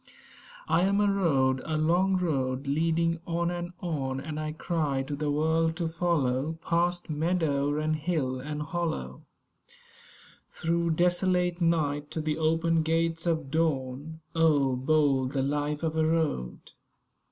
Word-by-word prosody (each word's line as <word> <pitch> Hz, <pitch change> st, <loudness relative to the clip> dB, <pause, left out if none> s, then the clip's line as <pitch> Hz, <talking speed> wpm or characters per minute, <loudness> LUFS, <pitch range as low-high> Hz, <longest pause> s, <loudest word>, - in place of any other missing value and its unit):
I -, -, +3 dB
am 200 Hz, +2 st, +2 dB
a 210 Hz, -, +3 dB
Road; 135 Hz, -9 st, +2 dB
a 155 Hz, -1 st, -2 dB
long 180 Hz, +5 st, +2 dB
road, 135 Hz, -6 st, -1 dB
leading 165 Hz, +3 st, +1 dB
on 170 Hz, 0 st, 0 dB
and 175 Hz, 0 st, -4 dB
on; 135 Hz, -6 st, -2 dB
And 155 Hz, +2 st, -5 dB
I 155 Hz, 0 st, -3 dB
cry 155 Hz, -4 st, -1 dB
to 145 Hz, +2 st, -4 dB
the 150 Hz, +1 st, -2 dB
world 160 Hz, +2 st, +1 dB
to 170 Hz, -1 st, -2 dB
follow, 160 Hz, -4 st, 0 dB
Past 175 Hz, +1 st, 0 dB
meadow 150 Hz, -3 st, 0 dB
and 155 Hz, +1 st, 0 dB
hill 150 Hz, -5 st, -1 dB
and 150 Hz, +3 st, -4 dB
hollow, 170 Hz, 0 st, -3 dB, 1.3 s
Through 170 Hz, 0 st, -1 dB
desolate 180 Hz, 0 st, +1 dB
night, 150 Hz, -3 st, +1 dB
to -, -, -4 dB
the 155 Hz, 0 st, -2 dB
open 165 Hz, +1 st, +2 dB
gates 165 Hz, +1 st, 0 dB
of 160 Hz, -5 st, -1 dB
dawn. 155 Hz, 0 st, -1 dB
Oh, 150 Hz, -5 st, +3 dB
bold 135 Hz, -1 st, +2 dB
the 135 Hz, -2 st, 0 dB
life 145 Hz, +2 st, -1 dB
of 160 Hz, -1 st, -1 dB
a 160 Hz, -, +2 dB
Road! 155 Hz, -, -1 dB
160 Hz, 140 wpm, -28 LUFS, 145-170 Hz, 1.3 s, I